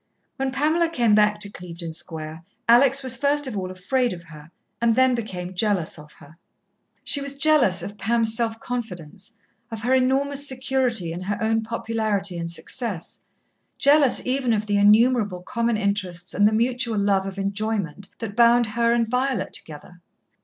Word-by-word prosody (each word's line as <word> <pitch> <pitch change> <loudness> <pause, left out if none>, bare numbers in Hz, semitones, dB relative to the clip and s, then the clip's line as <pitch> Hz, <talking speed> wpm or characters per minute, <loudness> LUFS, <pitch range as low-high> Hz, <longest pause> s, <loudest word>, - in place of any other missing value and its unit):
When 270 -1 -1
Pamela 310 +5 +1
came 240 -9 +2
back 210 0 +3
to 200 - -2
Clevedon 170 -3 -8
Square, 160 -1 -6 0.2
Alex 265 +3 +5
was 260 -1 -2
first 285 +2 +1
of 255 -5 -3
all 185 -2 -3
afraid 240 +7 -1
of 170 -1 -10
her, 155 -2 -14 0.3
and 230 -1 +3
then 260 0 +4
became 190 -6 -5
jealous 185 -5 -1
of 150 0 -14
her. 150 +3 -17 0.7
She 285 - -1
was 280 0 -2
jealous 280 - +4
of 205 0 -8
Pam's 225 +1 +2
self 225 -1 -2
confidence, 205 -3 -7 0.3
of 225 -1 -7
her 250 +2 +1
enormous 275 +2 +1
security 255 -8 -1
in 175 - -6
her 205 +2 -3
own 225 0 +1
popularity 215 -4 -2
and 170 0 -4
success, 185 +1 -4 0.6
jealous 285 -2 +4
even 255 -2 0
of 215 -1 -1
the 205 -1 0
innumerable 210 -2 +3
common 235 0 -1
interests 190 -4 -2
and 205 +2 +4
the - - +2
mutual 235 0 0
love 200 -1 +1
of 195 0 -7
enjoyment 200 -3 -3
that 215 -3 -6
bound 235 +1 +5
her 235 +2 +1
and 235 -1 +1
Violet 250 -3 -1
together. 165 +3 -8
220 Hz, 165 wpm, -23 LUFS, 190-250 Hz, 0.7 s, Alex